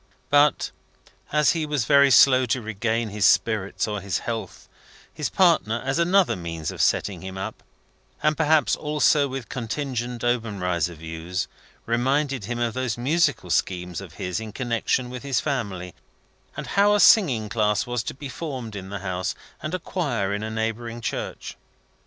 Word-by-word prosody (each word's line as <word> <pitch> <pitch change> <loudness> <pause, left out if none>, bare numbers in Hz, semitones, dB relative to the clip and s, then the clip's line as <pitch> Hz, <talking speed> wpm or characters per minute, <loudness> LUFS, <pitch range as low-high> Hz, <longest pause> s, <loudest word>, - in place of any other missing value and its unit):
But, 145 +1 +4 0.6
as 150 -2 +4
he 165 -2 -1
was 145 -6 0
very 140 +3 +6
slow 130 +1 +6
to 125 - +1
regain 110 +1 -2
his 105 +1 +2
spirits 105 -3 +1
or 105 -2 -3
his 100 -2 -1
health, 115 -2 -5 0.5
his 150 -2 -2
partner, 165 - +3
as 135 +4 0
another 180 +2 +3
means 85 -3 -4
of - - -4
setting 95 -5 +1
him 95 +1 -7
up 100 +3 -5 0.6
and 150 0 +3
perhaps 150 -6 +3
also 150 -1 +2
with 135 -2 -6
contingent 125 -1 -4
Obenreizer 95 -9 -1
views 80 +3 -4 0.4
reminded 130 +1 0
him 120 +3 -3
of 120 -1 -1
those 130 -2 -2
musical 135 - +1
schemes 90 0 -1
of 95 -5 -11
his 90 +4 -3
in 110 -2 -7
connection 125 +1 -1
with 125 -1 -6
his 135 -4 0
family, 100 - -3 0.6
and - - -4
how 205 +1 +5
a - - +2
singing 135 - +5
class 105 0 +1
was 120 -1 -2
to - - -6
be 140 +1 -7
formed 130 -7 -6
in 95 -1 -7
the 100 -2 -5
house, 90 -1 -2 0.3
and 155 +4 -3
a - - -3
Choir 120 - -2
in 105 - -2
a 110 - -3
neighbouring 115 +1 -3
church. 115 - -5
120 Hz, 165 wpm, -24 LUFS, 100-140 Hz, 0.6 s, very